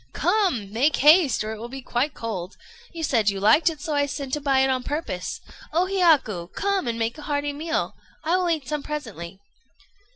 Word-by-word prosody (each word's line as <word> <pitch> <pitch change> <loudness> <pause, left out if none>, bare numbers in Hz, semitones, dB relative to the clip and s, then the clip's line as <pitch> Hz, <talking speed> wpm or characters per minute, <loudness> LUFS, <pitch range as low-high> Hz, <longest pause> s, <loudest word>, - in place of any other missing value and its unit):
"Come! 330 - 0
make 275 +7 +2
haste, 300 -4 +5
or 215 - -4
it 220 - -6
will 235 +2 -7
be 265 +1 -8
quite 260 +4 -1
cold. 195 -5 -5 0.3
You 330 -2 -6
said 225 -8 +2
you 200 -1 -3
liked 255 - +5
it, 315 -3 -7
so 315 0 -3
I 285 -1 +2
sent 270 0 -5
to 295 - 0
buy 270 -2 +3
it 265 - +3
on 255 -1 0
purpose. 250 - -4 0.3
O 340 +4 +2
Hiyaku! 315 - +2
come 395 -7 0
and 230 -1 -1
make 230 +5 -2
a 300 - -9
hearty 290 0 -1
meal. 320 +3 -2 0.3
I 330 +3 +2
will 365 -1 +1
eat 310 -6 -1
some 300 -1 -2
presently." 215 - -6
280 Hz, 205 wpm, -24 LUFS, 230-315 Hz, 0.3 s, haste